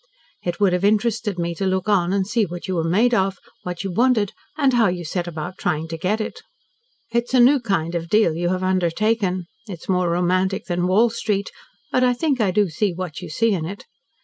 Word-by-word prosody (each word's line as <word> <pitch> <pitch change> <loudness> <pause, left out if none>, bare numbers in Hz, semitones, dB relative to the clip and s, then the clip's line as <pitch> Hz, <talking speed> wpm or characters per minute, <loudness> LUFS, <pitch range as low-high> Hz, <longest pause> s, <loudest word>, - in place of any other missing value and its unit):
It 175 -1 -3
would 200 -3 +3
have 180 +1 0
interested 215 -1 +1
me 170 0 -1
to 190 +3 -2
look 190 0 -1
on 185 -4 +2
and 195 -1 +1
see 220 +3 +1
what 175 +2 -7
you 190 - -2
were 165 -2 0
made 230 +8 +3
of, 195 -3 +1 0.2
what 180 0 -5
you 195 - -3
wanted, 225 0 +2 0.3
and 275 -4 +3
how 235 -3 +4
you 175 -1 -2
set 175 +2 -3
about 175 +2 -6
trying 160 -3 -1
to 165 - -4
get 185 +6 0
it. 215 - -5 0.7
It's 235 +2 0
a - - +5
new 265 +4 +6
kind 195 -8 -1
of 170 -1 -3
deal 210 -5 +3
you 175 +2 -1
have 185 0 -1
undertaken. 185 +1 0 0.2
It's 180 -5 -9
more 180 -2 +1
romantic 185 +2 +1
than 175 0 -1
Wall 220 +5 +4
Street, 210 -3 -2 0.4
but 255 - +2
I 250 0 +4
think 275 -2 0
I 205 - +3
do 205 +2 +2
see 180 +3 -1
what 180 -3 -5
you - - -7
see 225 +8 +1
in 175 -5 -2
it. 200 +3 -8
190 Hz, 225 wpm, -22 LUFS, 175-220 Hz, 0.7 s, new